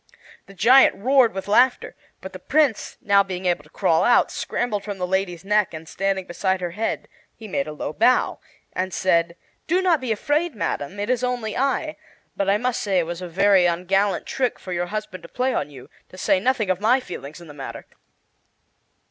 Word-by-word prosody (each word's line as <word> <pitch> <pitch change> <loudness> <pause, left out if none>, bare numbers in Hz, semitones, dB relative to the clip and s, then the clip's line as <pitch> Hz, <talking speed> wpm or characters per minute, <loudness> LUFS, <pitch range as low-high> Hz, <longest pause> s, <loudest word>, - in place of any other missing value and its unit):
The 195 - -14
giant 255 +7 +6
roared 255 +2 +3
with 190 +1 -6
laughter, 245 +5 +2 0.3
but - - -9
the - - -8
Prince, 300 -8 0
now 200 -1 +4
being 190 -1 -5
able 175 -4 0
to 150 - -20
crawl 165 -2 +1
out, 245 - +4
scrambled 215 -5 -2
from 205 -1 -5
the 180 - -2
lady's 185 -1 -2
neck, 210 -4 +1
and, 160 +1 -9
standing 195 +1 -2
beside 190 +2 -1
her 175 -1 -4
head, 215 +5 -3 0.3
he 220 - -10
made 145 -8 -2
a - - -5
low 150 0 -5
bow 250 +7 +2 0.3
and 185 +1 -2
said: 170 -2 +1 0.3
"Do 355 +3 +2
not 350 -6 +2
be 250 -3 -2
afraid, 295 +8 0
Madam; 170 -1 -3
it 205 +4 -1
is 250 -1 0
only 245 -3 -2
I. 275 +4 -1 0.4
But 195 -1 -1
I 200 - +4
must 250 +2 -1
say 195 -3 0
it 175 - +2
was 175 +2 -6
a 180 - -5
very 190 +1 +4
ungallant 190 +4 0
trick 255 -2 -1
for 185 - -7
your 175 0 -2
husband 205 -3 -5
to 170 - -13
play 255 +1 -1
on 150 - -2
you, 130 -3 -13 0.2
to 185 - -14
say 185 - +2
nothing 215 -2 +1
of 185 +1 -2
my 240 +5 +4
feelings 155 - -9
in 170 - -13
the 150 - -11
matter." 130 -5 -8
195 Hz, 205 wpm, -23 LUFS, 175-240 Hz, 0.4 s, giant